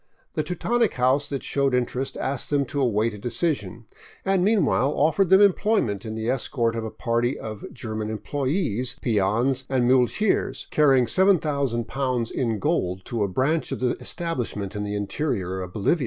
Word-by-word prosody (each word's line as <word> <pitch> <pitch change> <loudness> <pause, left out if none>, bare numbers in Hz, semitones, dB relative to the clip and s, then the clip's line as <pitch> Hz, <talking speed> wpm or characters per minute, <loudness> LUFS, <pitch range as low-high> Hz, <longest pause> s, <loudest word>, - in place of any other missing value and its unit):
The - - 0
Teutonic 225 +8 0
house 130 +3 +2
that 140 -2 -3
showed 140 -2 +1
interest 125 +2 -2
asked 135 0 -2
them 145 -1 +1
to 140 +2 -3
await 115 -2 +1
a 105 - -9
decision, 115 - -2 0.4
and 195 -2 +2
meanwhile 190 - +2
offered 165 +5 +2
them 190 +1 +7
employment 200 - +2
in 110 - -5
the 110 0 -3
escort 120 -2 0
of 115 - -3
a 110 - -4
party 120 +3 -1
of 110 -2 -7
German 110 -2 -5
employees, 130 - -1
peons, 115 +4 +1
and 130 -2 +2
muleteers 130 - +1
car 150 -1 +4
rying 135 -2 +5
i'jooo 135 - +1
in 115 -4 -1
gold 95 - -1
to 115 -2 -3
a - - +1
branch 135 - 0
of - - -3
the 125 -1 0
establishment 125 - -3
in 105 - -2
the 105 0 -3
interior 100 - -2
of 90 -1 -6
Bolivia. 110 - +1
125 Hz, 170 wpm, -24 LUFS, 110-150 Hz, 0.4 s, them